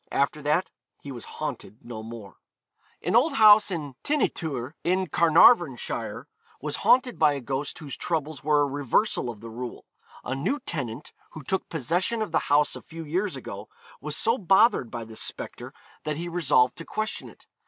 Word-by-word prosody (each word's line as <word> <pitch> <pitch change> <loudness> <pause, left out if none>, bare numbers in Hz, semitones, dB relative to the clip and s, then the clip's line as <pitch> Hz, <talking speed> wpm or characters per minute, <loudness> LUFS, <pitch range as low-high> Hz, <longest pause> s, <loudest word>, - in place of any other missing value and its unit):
After 140 +2 0
that 150 +6 0 0.3
he 140 - -9
was 120 -3 -7
haunted 110 - -6
no 120 -2 -7
more. 110 -3 -10 0.7
An 180 +7 0
old 275 +5 +4
house 215 -2 +7
at 155 -7 -4
Ty'n 295 -1 0
y - - +4
Twr, 135 -7 -4
in 185 +2 +1
Carnarvonshire, 165 - +3 0.3
was - - -3
haunted 250 -1 +3
by 150 - +5
a 140 - -3
ghost 135 +3 -4
whose 145 -4 -7
troubles 155 -3 -3
were 150 0 +3
a - - +3
reversal 140 - 0
of 110 -3 -8
the 115 - -8
rule. 120 +1 -7 0.4
A 130 - -3
new 185 - -1
tenant, 130 -4 -4 0.2
who 155 - -9
took 190 +8 -2
possession 175 - 0
of 210 - -6
the - - +3
house 145 +1 +3
a - - -8
few 165 0 -9
years 180 +3 -1
ago, 105 -5 -8 0.3
was 150 +1 -2
so 230 +3 +2
bothered 190 - +4
by 115 0 -6
this 110 0 -7
spectre - - -7 0.3
that 150 -1 -2
he 170 +2 -4
resolved 145 -7 +2
to 165 - -7
question 215 0 -3
it. - - -18
150 Hz, 185 wpm, -26 LUFS, 130-185 Hz, 0.7 s, house